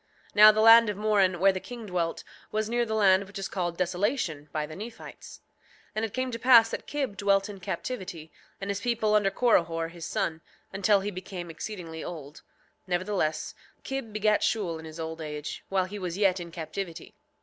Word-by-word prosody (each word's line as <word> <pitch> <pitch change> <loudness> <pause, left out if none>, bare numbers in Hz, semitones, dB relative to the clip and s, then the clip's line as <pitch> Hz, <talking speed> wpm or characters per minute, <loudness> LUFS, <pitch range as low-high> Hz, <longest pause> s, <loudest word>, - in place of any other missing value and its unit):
7:6 - - -29
Now 215 +1 +10
the 215 0 +1
land 225 0 +8
of 205 - -3
Moron, 200 -4 +2
where 195 +2 +6
the 190 - -4
king 235 +2 -9
dwelt, 175 -4 -2 0.3
was 215 0 -1
near 240 +1 0
the 220 - -1
land 195 -2 +4
which 200 - -9
is 195 0 -3
called 175 -3 -3
Desolation 180 - -1
by 155 -1 -2
the 155 - -10
Nephites. 225 +4 -10 0.5
7:7 - - -36
And 215 +1 -1
it 220 - -7
came 255 0 -1
to 230 - -5
pass 230 -2 +7
that - - -5
Kib 275 -8 -2
dwelt 200 -1 +2
in 200 -2 -8
captivity, 175 -4 -5 0.3
and 195 0 -3
his 200 - -3
people 225 -3 +1
under 210 -2 +4
Corihor 170 -7 +1
his 170 -1 -7
son, 160 0 -2 0.3
until 200 +1 +3
he 205 +2 -3
became 180 -2 -7
exceedingly 165 -3 -7
old; 155 -3 -8 0.5
nevertheless 180 -4 -1 0.3
Kib 270 -5 -4
begat 215 0 +2
Shule 195 -8 0
in 160 - -10
his 160 +1 -10
old 160 0 -5
age, 150 -1 -6
while 190 -1 +1
he 205 +2 -7
was 180 -2 -4
yet 195 -2 +3
in 170 -1 -7
captivity. 170 +1 -6
195 Hz, 200 wpm, -28 LUFS, 170-215 Hz, 0.5 s, Now